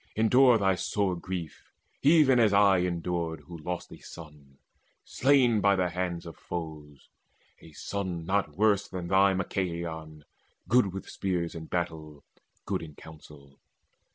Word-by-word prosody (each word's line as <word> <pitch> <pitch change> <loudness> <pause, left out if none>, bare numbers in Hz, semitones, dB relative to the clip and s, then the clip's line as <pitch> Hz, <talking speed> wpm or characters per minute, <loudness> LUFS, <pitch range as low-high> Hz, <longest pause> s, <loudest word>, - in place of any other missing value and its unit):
Endure 125 +3 +5
thy 95 -2 +2
sore 95 +1 -1
grief, 85 -3 -7 0.3
even 145 -4 +5
as 110 -3 +4
I 100 -2 +5
endured, 85 -2 -2
Who 85 +4 -11
lost 90 +3 -5
a - - -11
son, 75 -4 -13 0.5
slain 130 -5 +3
by 100 0 +4
the 90 -1 0
hands 90 -1 -3
of 85 - -10
foes, 75 -5 -8 0.5
A 80 - -15
son 90 -2 -4
not 95 -5 -1
worse 100 -1 +2
than 90 -3 -6
thy 95 0 +4
Machaon, 85 -4 -4 0.4
good 120 -5 +3
With 95 +1 -7
spears 90 -3 -3
in 80 -1 -7
battle, 80 -4 -4 0.4
good - - -2
in 75 -3 -10
counsel. 75 -3 -15
90 Hz, 140 wpm, -28 LUFS, 80-100 Hz, 0.5 s, Endure